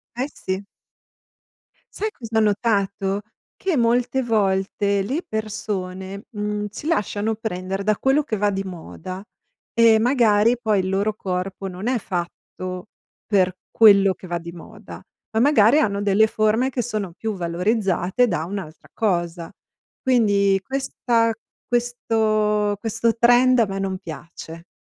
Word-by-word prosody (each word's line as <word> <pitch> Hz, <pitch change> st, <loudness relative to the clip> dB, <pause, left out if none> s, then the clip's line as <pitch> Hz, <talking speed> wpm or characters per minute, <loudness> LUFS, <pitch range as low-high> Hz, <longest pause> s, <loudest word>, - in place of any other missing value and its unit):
Eh, 255 Hz, +3 st, -1 dB
sì. 190 Hz, +1 st, -4 dB, 1.3 s
Sai 430 Hz, +1 st, -3 dB
cos'ho 225 Hz, -, -2 dB
notato? 200 Hz, -2 st, 0 dB, 0.3 s
Che 375 Hz, -6 st, -1 dB
molte 245 Hz, +2 st, +2 dB
volte 200 Hz, -2 st, +1 dB
le 280 Hz, -, -2 dB
persone, 200 Hz, -, -4 dB
mhmm, 210 Hz, -1 st, -3 dB
si 225 Hz, +9 st, -8 dB
lasciano 220 Hz, -7 st, 0 dB
prendere 195 Hz, -3 st, -4 dB
da 215 Hz, 0 st, +2 dB
quello 275 Hz, +3 st, +2 dB
che 220 Hz, -, -3 dB
va 205 Hz, 0 st, +1 dB
di 195 Hz, -1 st, -2 dB
moda, 185 Hz, -, -8 dB, 0.5 s
e 230 Hz, -1 st, +6 dB
magari 230 Hz, -2 st, +3 dB
poi 215 Hz, -4 st, +2 dB
il 185 Hz, -, -1 dB
loro 200 Hz, +2 st, 0 dB
corpo 190 Hz, 0 st, -4 dB
non 185 Hz, +5 st, -6 dB
è 255 Hz, -, +2 dB
fatto 185 Hz, -1 st, -5 dB, 0.4 s
per 185 Hz, -3 st, +2 dB, 0.2 s
quello 200 Hz, -3 st, +6 dB
che 185 Hz, -, -12 dB
va 175 Hz, 0 st, -2 dB
di 170 Hz, 0 st, -8 dB
moda, 170 Hz, -, -11 dB, 0.3 s
ma 220 Hz, -, +2 dB
magari 275 Hz, 0 st, +5 dB
hanno 200 Hz, -7 st, 0 dB
delle 205 Hz, +2 st, +4 dB
forme 215 Hz, +4 st, +1 dB
che 250 Hz, -2 st, -2 dB
sono 215 Hz, -6 st, -3 dB
più 220 Hz, +4 st, -4 dB
valorizzate 185 Hz, +4 st, 0 dB
da 170 Hz, -6 st, -1 dB
un'altra 180 Hz, -4 st, -7 dB
cosa. 175 Hz, -5 st, -1 dB, 0.5 s
Quindi, 200 Hz, -6 st, +3 dB
questa 240 Hz, -3 st, 0 dB, 0.3 s
questo 215 Hz, -3 st, +1 dB
questo 230 Hz, 0 st, 0 dB
trend 245 Hz, +2 st, +5 dB
a 225 Hz, -, +5 dB
me 195 Hz, 0 st, -4 dB
non 190 Hz, -1 st, -2 dB
piace. 165 Hz, -1 st, -10 dB
205 Hz, 135 wpm, -22 LUFS, 190-230 Hz, 1.3 s, e